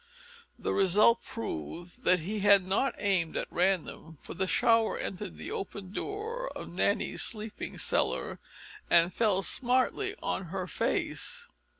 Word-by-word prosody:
The -, -, -2 dB
result 210 Hz, +5 st, +4 dB
proved 175 Hz, -, -6 dB
that 180 Hz, -2 st, +4 dB
he 210 Hz, +6 st, -3 dB
had 200 Hz, -2 st, +6 dB
not 205 Hz, +8 st, +1 dB
aimed 185 Hz, -6 st, +1 dB
at -, -, -1 dB
random, 175 Hz, -3 st, -1 dB
for -, -, -9 dB
the 190 Hz, +2 st, -1 dB
shower 225 Hz, +2 st, +3 dB
entered 130 Hz, -, -5 dB
the 80 Hz, -, -7 dB
open 195 Hz, -1 st, -5 dB
door 445 Hz, -, -4 dB
of -, -, -8 dB
Nanny's -, -, +1 dB
sleeping 215 Hz, -2 st, -3 dB
cellar -, -, 0 dB, 0.5 s
and 170 Hz, +1 st, +5 dB
fell 200 Hz, -3 st, +2 dB
smartly 260 Hz, -, +1 dB
on 190 Hz, -, -2 dB
her 185 Hz, +2 st, -4 dB
face. 175 Hz, -, -2 dB
195 Hz, 135 wpm, -30 LUFS, 180-230 Hz, 0.5 s, had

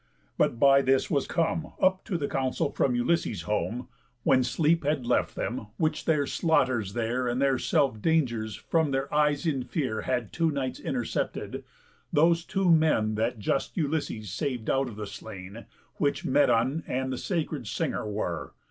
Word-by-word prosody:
But 115 Hz, -, +1 dB
by 140 Hz, +1 st, +6 dB
this 135 Hz, 0 st, +2 dB
was 140 Hz, -3 st, +1 dB
come 165 Hz, -1 st, -1 dB
Up 185 Hz, 0 st, +3 dB
to 190 Hz, -6 st, -1 dB
the 145 Hz, -3 st, -2 dB
council 130 Hz, -1 st, -1 dB
from 125 Hz, -, +1 dB
Ulysses' 120 Hz, -, 0 dB
home— 115 Hz, +4 st, -2 dB, 0.4 s
When 130 Hz, -, +4 dB
sleep 165 Hz, +5 st, +2 dB
had 145 Hz, -3 st, 0 dB
left 120 Hz, -, +1 dB
them, 115 Hz, -3 st, -3 dB
which 155 Hz, -1 st, 0 dB
the 155 Hz, -3 st, +2 dB
slaughters 130 Hz, -, +1 dB
there 120 Hz, +2 st, -1 dB
And 120 Hz, +1 st, -1 dB
their 135 Hz, -2 st, +2 dB
self 130 Hz, -6 st, +1 dB
dangers 120 Hz, -9 st, +1 dB
from 160 Hz, -3 st, 0 dB
their 135 Hz, 0 st, -2 dB
eyes 150 Hz, 0 st, +2 dB
in 145 Hz, -5 st, +1 dB
fear 125 Hz, -4 st, -2 dB
Had 125 Hz, -4 st, -2 dB
two 165 Hz, -1 st, +2 dB
nights 135 Hz, -4 st, -3 dB
intercepted—those 170 Hz, -, -2 dB
two 190 Hz, -2 st, +2 dB
men 155 Hz, -10 st, +3 dB
That 115 Hz, +3 st, -1 dB
just 110 Hz, -, -1 dB
Ulysses 145 Hz, -, -2 dB
sav'd 125 Hz, -, -2 dB
out 135 Hz, 0 st, +1 dB
of 110 Hz, -, -9 dB
the 105 Hz, 0 st, -5 dB
slain, 100 Hz, +1 st, -9 dB, 0.3 s
Which 145 Hz, -2 st, 0 dB
Medon 130 Hz, +2 st, +2 dB
and 130 Hz, +1 st, -1 dB
the -, -, -3 dB
sacred 155 Hz, -, -2 dB
singer 105 Hz, -, -2 dB
were. 90 Hz, -6 st, -3 dB
135 Hz, 165 wpm, -28 LUFS, 115-155 Hz, 0.4 s, by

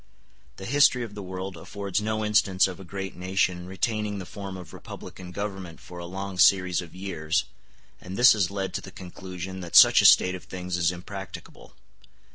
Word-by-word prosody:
The 95 Hz, -, -9 dB
history 130 Hz, 0 st, +4 dB
of 110 Hz, -3 st, -8 dB
the 105 Hz, -, -7 dB
world 95 Hz, 0 st, -6 dB
affords 100 Hz, +3 st, -4 dB
no 110 Hz, 0 st, -1 dB
instance 95 Hz, -3 st, +3 dB
of 95 Hz, -1 st, -8 dB
a -, -, -9 dB
great 95 Hz, +1 st, -6 dB
nation 90 Hz, -1 st, -1 dB
retaining 105 Hz, +2 st, -2 dB
the 95 Hz, -, -6 dB
form 100 Hz, 0 st, -7 dB
of 90 Hz, -4 st, -11 dB
republican 90 Hz, -1 st, -10 dB
government 95 Hz, -3 st, -6 dB
for 90 Hz, -, -11 dB
a 85 Hz, -, -7 dB
long 95 Hz, 0 st, -6 dB
series 90 Hz, -2 st, +4 dB
of 85 Hz, -1 st, -12 dB
years, 90 Hz, -1 st, -1 dB, 0.6 s
*r -, -, -14 dB
and 95 Hz, +2 st, -6 dB
this 125 Hz, +2 st, +8 dB
has 100 Hz, -5 st, +1 dB
led 95 Hz, -2 st, -4 dB
to -, -, -3 dB
the -, -, -10 dB
conclusion 95 Hz, 0 st, -8 dB
that 85 Hz, -2 st, -7 dB
such -, -, +9 dB
a -, -, +1 dB
state 90 Hz, -, +7 dB
of 90 Hz, -, -8 dB
things 90 Hz, -1 st, -5 dB
is 85 Hz, -1 st, +2 dB
impracticable. 95 Hz, +2 st, -9 dB
95 Hz, 195 wpm, -26 LUFS, 90-100 Hz, 0.6 s, such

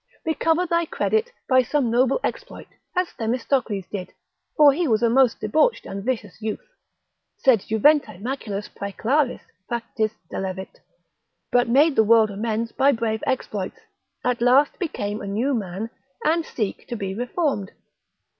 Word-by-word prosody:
recover 325 Hz, +2 st, +1 dB
thy 340 Hz, 0 st, +1 dB
credit 440 Hz, +8 st, 0 dB, 0.2 s
by 255 Hz, -1 st, +5 dB
some 255 Hz, -1 st, 0 dB
noble 255 Hz, -, +3 dB
exploit, -, -, -5 dB, 0.3 s
as 365 Hz, -1 st, +1 dB
Themistocles 230 Hz, -3 st, -1 dB
did, 185 Hz, -3 st, -5 dB, 0.5 s
for 295 Hz, -3 st, +7 dB
he 335 Hz, +3 st, 0 dB
was 225 Hz, -2 st, +2 dB
a 230 Hz, -, +4 dB
most 260 Hz, -1 st, +4 dB
debauched 310 Hz, -, +2 dB
and 195 Hz, 0 st, -6 dB
vicious 225 Hz, -4 st, -3 dB
youth, 220 Hz, -, -5 dB, 0.7 s
sed 255 Hz, -5 st, +4 dB
juventae 220 Hz, -, +2 dB
maculas 210 Hz, -4 st, -4 dB
praeclaris 245 Hz, +7 st, -1 dB, 0.3 s
factis 225 Hz, -2 st, -2 dB, 0.2 s
delevit, 190 Hz, 0 st, -5 dB, 0.7 s
but 245 Hz, -1 st, +3 dB
made 285 Hz, +5 st, +4 dB
the 220 Hz, -, +5 dB
world 220 Hz, -1 st, +5 dB
amends 225 Hz, +2 st, -2 dB
by 275 Hz, +1 st, +3 dB
brave 225 Hz, -3 st, -2 dB
exploits; 210 Hz, -7 st, -2 dB, 0.5 s
at 245 Hz, -1 st, 0 dB
last 260 Hz, +4 st, +4 dB
become 210 Hz, -, -3 dB
a 200 Hz, -, -6 dB
new 230 Hz, +8 st, 0 dB
man, 200 Hz, -2 st, -3 dB, 0.4 s
and 325 Hz, +1 st, +2 dB
seek 210 Hz, -5 st, -4 dB
to 240 Hz, -, -4 dB
be 195 Hz, -3 st, -4 dB
reformed. 245 Hz, -, -1 dB
235 Hz, 145 wpm, -23 LUFS, 210-280 Hz, 0.7 s, for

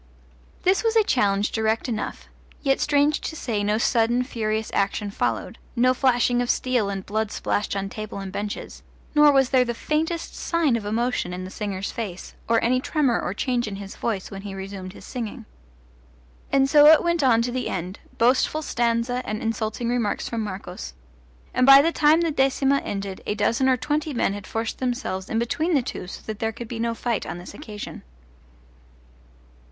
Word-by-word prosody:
This 375 Hz, +4 st, +3 dB
was 455 Hz, 0 st, +1 dB
a 445 Hz, -, +6 dB
challenge 205 Hz, -, +1 dB
direct 220 Hz, +1 st, 0 dB
enough, 225 Hz, -3 st, -4 dB, 0.4 s
yet 270 Hz, -2 st, +2 dB
strange 295 Hz, 0 st, +2 dB
to 315 Hz, -, -5 dB
say 225 Hz, -8 st, -2 dB
no 210 Hz, +1 st, +1 dB
sudden 235 Hz, +1 st, +2 dB
furious 220 Hz, -3 st, -2 dB
action 200 Hz, +1 st, 0 dB
followed, -, -, -2 dB, 0.2 s
no 255 Hz, +1 st, +4 dB
flashing 245 Hz, -2 st, +2 dB
of 245 Hz, -, -2 dB
steel 245 Hz, -5 st, +1 dB
and 195 Hz, -1 st, -4 dB
blood 215 Hz, +1 st, -1 dB
splashed 205 Hz, -, -1 dB
on 195 Hz, 0 st, -2 dB
table 215 Hz, +1 st, -6 dB
and 195 Hz, -1 st, -5 dB
benches; 205 Hz, +1 st, -5 dB, 0.3 s
nor 295 Hz, -1 st, +7 dB
was 270 Hz, -2 st, +3 dB
there 260 Hz, -2 st, +5 dB
the 240 Hz, -1 st, -3 dB
faintest 320 Hz, +5 st, -2 dB
sign 330 Hz, -7 st, +1 dB
of 215 Hz, -3 st, -3 dB
emotion 230 Hz, -4 st, -1 dB
in 185 Hz, -, -5 dB
the 185 Hz, -, -7 dB
singer's 200 Hz, -2 st, -4 dB
face, 195 Hz, -6 st, -6 dB, 0.2 s
or 230 Hz, 0 st, +4 dB
any 255 Hz, +2 st, +2 dB
tremor 275 Hz, -5 st, +1 dB
or 185 Hz, -, -3 dB
change 245 Hz, 0 st, 0 dB
in 205 Hz, -, -4 dB
his 195 Hz, 0 st, -8 dB
voice 210 Hz, -5 st, -3 dB
when 195 Hz, -1 st, -7 dB
he 200 Hz, -1 st, -7 dB
resumed 190 Hz, -1 st, -7 dB
his -, -, -12 dB
singing. 235 Hz, -1 st, -6 dB, 1.1 s
And 270 Hz, 0 st, +4 dB
so 295 Hz, +1 st, +7 dB
it 315 Hz, 0 st, +8 dB
went 340 Hz, -1 st, +1 dB
on 230 Hz, -4 st, +4 dB
to 245 Hz, -, -2 dB
the 255 Hz, 0 st, -2 dB
end 185 Hz, +2 st, -4 dB, 0.2 s
boastful 255 Hz, +6 st, +2 dB
stanza 235 Hz, 0 st, 0 dB
and 215 Hz, -2 st, -3 dB
insulting 225 Hz, +1 st, -2 dB
remarks 235 Hz, -3 st, -1 dB
from 230 Hz, -1 st, -2 dB
Marcos; 185 Hz, -, -6 dB, 0.6 s
and 255 Hz, -, +2 dB
by 275 Hz, +1 st, +10 dB
the 330 Hz, -, +2 dB
time 310 Hz, +1 st, +4 dB
the 335 Hz, -1 st, +1 dB
decima 270 Hz, 0 st, +2 dB
ended 195 Hz, -4 st, -5 dB
a 210 Hz, -, 0 dB
dozen 230 Hz, +5 st, +2 dB
or 255 Hz, -, +3 dB
twenty 300 Hz, +2 st, -2 dB
men 200 Hz, -, +1 dB
had 205 Hz, -2 st, -7 dB
forced 225 Hz, 0 st, -3 dB
themselves 240 Hz, -7 st, -2 dB
in 225 Hz, -, -1 dB
between 310 Hz, +9 st, 0 dB
the 270 Hz, -, +2 dB
two 210 Hz, -, -6 dB
so -, -, -9 dB
that 215 Hz, -1 st, -5 dB
there 225 Hz, 0 st, 0 dB
could 235 Hz, +1 st, -8 dB
be 230 Hz, 0 st, -6 dB
no 230 Hz, 0 st, -1 dB
fight 235 Hz, -1 st, -1 dB
on 160 Hz, -, -5 dB
this 175 Hz, -, -10 dB
occasion. 215 Hz, -8 st, -8 dB
230 Hz, 190 wpm, -24 LUFS, 205-265 Hz, 1.1 s, by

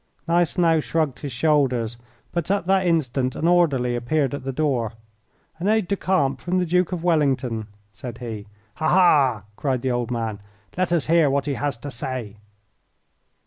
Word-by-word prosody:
Gneisenau 170 Hz, -1 st, +3 dB
shrugged 155 Hz, -3 st, -1 dB
his 145 Hz, -, -5 dB
shoulders, 125 Hz, -4 st, +1 dB, 0.4 s
but 170 Hz, -1 st, -2 dB
at 200 Hz, -2 st, +1 dB
that 190 Hz, 0 st, +2 dB
instant 135 Hz, -6 st, 0 dB
an 165 Hz, -, 0 dB
orderly 140 Hz, -9 st, +3 dB
appeared 135 Hz, +3 st, 0 dB
at 140 Hz, -, -5 dB
the 135 Hz, -, -3 dB
door. 130 Hz, -6 st, 0 dB, 0.7 s
"An 180 Hz, -, -2 dB
aide 215 Hz, -3 st, +2 dB
de 200 Hz, -, 0 dB
camp 140 Hz, -10 st, 0 dB
from 180 Hz, +1 st, -1 dB
the 180 Hz, -, +1 dB
Duke 180 Hz, +1 st, +1 dB
of 175 Hz, -2 st, -3 dB
Wellington," 135 Hz, -9 st, +1 dB, 0.3 s
said 120 Hz, +3 st, -8 dB
he. 110 Hz, -4 st, -7 dB, 0.3 s
"Ha, 155 Hz, -, 0 dB
ha!" 145 Hz, -, +4 dB
cried 130 Hz, -2 st, -1 dB
the 130 Hz, -, +1 dB
old 120 Hz, -1 st, -1 dB
man; 115 Hz, -4 st, -3 dB, 0.4 s
"let 185 Hz, -1 st, 0 dB
us 170 Hz, -4 st, +2 dB
hear 165 Hz, -2 st, +4 dB
what 140 Hz, 0 st, 0 dB
he 145 Hz, -, -1 dB
has 140 Hz, -2 st, -2 dB
to 145 Hz, +5 st, -7 dB
say!" 120 Hz, -4 st, -5 dB
140 Hz, 175 wpm, -23 LUFS, 125-170 Hz, 0.7 s, ha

